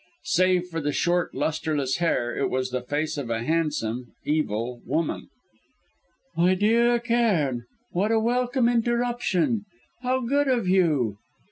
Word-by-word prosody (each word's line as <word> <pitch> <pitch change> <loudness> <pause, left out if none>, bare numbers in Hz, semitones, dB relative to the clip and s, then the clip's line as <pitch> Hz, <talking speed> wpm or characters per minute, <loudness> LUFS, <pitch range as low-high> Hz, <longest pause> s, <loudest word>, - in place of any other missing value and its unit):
Save 185 0 +2
for 165 -1 -3
the 145 0 -1
short, 175 +3 0
lustreless 150 -2 -1
hair 120 -9 0
it - - 0
was 130 0 -1
the 125 0 -2
face 150 +4 -2
of 130 -4 -5
a 115 0 -1
handsome, 130 -6 -1
evil 120 -5 -1
woman. 165 - -2 1.1
"My 180 +3 +3
dear 235 +4 +3
Cairn 210 - +1 0.3
what 200 +5 0
a 225 - +3
welcome 245 +2 +1
interruption. 235 -4 +1 0.4
How 255 +1 0
good 280 +4 +1
of 240 -7 +1
you!" 150 - +2
175 Hz, 135 wpm, -25 LUFS, 140-235 Hz, 1.1 s, My